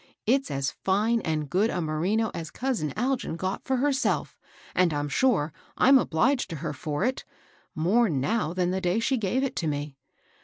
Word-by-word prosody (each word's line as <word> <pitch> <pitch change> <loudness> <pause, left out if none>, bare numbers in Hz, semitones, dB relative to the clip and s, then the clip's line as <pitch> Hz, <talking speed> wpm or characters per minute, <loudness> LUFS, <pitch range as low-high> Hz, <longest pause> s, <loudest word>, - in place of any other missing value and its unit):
It's 270 +4 +2
as 135 0 -1
fine 215 +5 +2
and 155 -4 -2
good 195 +10 +2
a 180 - -2
merino 175 +8 0
as 165 -2 -5
cousin 245 - -2
Algin 245 -7 -1
got 185 +2 -3
for 265 -1 +1
herself; 275 +1 0 0.4
and 180 -2 +3
I'm 145 0 -1
sure, 170 - +2 0.2
I'm 270 +1 +6
obliged 245 - +1
to 165 - -4
her 155 0 -4
for 145 +2 -3
it, 260 +1 -1 0.3
— - - -34
more 230 +5 +4
now 155 - 0
than 180 0 0
the 190 +1 -1
day 180 +4 +1
she 260 +3 +1
gave 225 +5 0
it 275 - -2
to 165 - -1
me. 145 -1 -3
190 Hz, 190 wpm, -27 LUFS, 155-245 Hz, 0.4 s, I'm